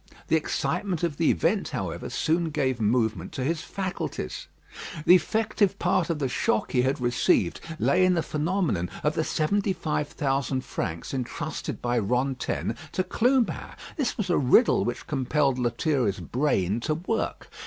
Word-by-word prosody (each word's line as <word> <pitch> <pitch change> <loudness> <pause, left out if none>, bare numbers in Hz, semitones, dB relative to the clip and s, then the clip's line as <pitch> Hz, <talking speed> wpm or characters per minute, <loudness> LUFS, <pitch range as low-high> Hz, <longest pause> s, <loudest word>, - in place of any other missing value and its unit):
The - - +4
excitement 180 -5 -1
of 160 -4 0
the 165 - +3
event, 80 - +1
however, - - -4
soon 165 +1 0
gave 130 -6 -1
movement 110 -4 +1
to 130 - -3
his 160 +3 0
faculties. 195 - -4 0.6
The 175 - +8
effective 210 +1 +2
part 175 0 +1
of 165 - 0
the 140 -3 0
shock 115 -3 0
he 125 - +3
had 135 +3 0
received 120 -7 +2 0.2
lay 185 +2 +3
in 185 0 +4
the 165 - +1
phenomenon 155 - 0
of 150 - +2
the 160 - 0
seventy 195 +6 +1
five 155 -4 -2
thousand 135 -3 -1
francs 85 +5 -4
entrusted 130 -3 -4
by 120 0 +1
Rantaine 125 +1 -1 0.2
to 185 - +1
Clubin; 250 +4 +1 0.2
this 280 -5 -1
was 200 -5 -1
a - - +3
riddle 145 - +4
which 120 - -3
compelled 135 -1 +1
Lethierry's 120 -3 0
brain 115 -7 0
to 155 +6 -1
work. 185 +7 -3
150 Hz, 155 wpm, -26 LUFS, 125-180 Hz, 0.6 s, The